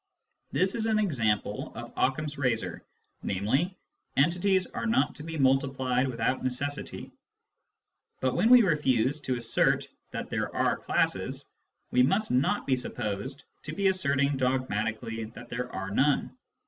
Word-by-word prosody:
This 190 +1 +2
is 225 -1 -1
an 220 -1 +2
example 120 - 0
of - - -8
Occam's 145 +3 0
razor, 115 -10 -1 0.4
namely, 135 - 0 0.2
" - - -35
entities 180 +6 +3
are - - -4
not 230 - +2
to 150 - -7
be 160 0 -5
multiplied 130 -1 +2
without 125 +1 -1
necessity." 145 +3 -3 1.1
But 130 -1 +1
when 205 +6 +3
we 250 -1 +9
refuse 145 - +2
to 130 -3 -1
assert 115 -1 +2 0.2
that - - -6
there - - -1
are - - +2
classes, - - -1 0.4
we 125 - +4
must 195 +12 +2
not 130 +2 +2
be 135 - +3
supposed 125 +2 -4 0.2
to 155 - -6
be 200 -1 +3
asserting 140 -6 +1
dogmatically 115 -3 -1
that - - -10
there 125 +1 -4
are 95 +1 -4
none. 140 +7 +2
135 Hz, 145 wpm, -28 LUFS, 125-160 Hz, 1.1 s, we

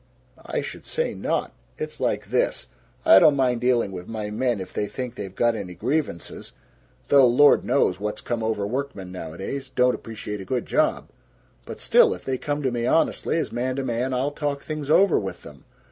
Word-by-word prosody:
I - - -3
should - - -8
say 480 +1 -2
not! - - -2 0.3
It's 460 - -6
like - - -1
this: - - +1 0.4
I 325 - +9
don't 155 -5 +6
mind 125 -3 +1
dealing 120 -5 +2
with 90 -1 -7
my 105 -2 -4
men 120 0 0
if 95 - -8
they 105 - -1
think 125 0 -5
they've 100 -5 -7
got 120 -1 +2
any 95 -5 -6
grievances 125 - -3 0.6
though 140 -3 +7
Lord 145 +5 +5
knows 95 -9 +1
what's 105 +1 -3
come 120 -2 -3
over 110 -2 -1
workmen, 120 -5 -4
nowadays 95 - -6
don't 125 -1 +3
appreciate 105 -2 -6
a - - -6
good 125 +6 -2
job. 310 +1 0 0.6
But - - -7
still, 485 -2 +4
if - - -14
they 130 -1 -2
come 145 0 -2
to 130 - +1
me 120 0 -1
honestly, 160 +2 +1
as 165 - -2
man 130 +2 -2
to 135 - -2
man, 125 +1 -1
I'll 130 +3 0
talk 145 -1 -3
things 155 -2 -5
over 190 +3 +5
with 95 -2 -6
them. - - -13
125 Hz, 195 wpm, -24 LUFS, 105-140 Hz, 0.6 s, I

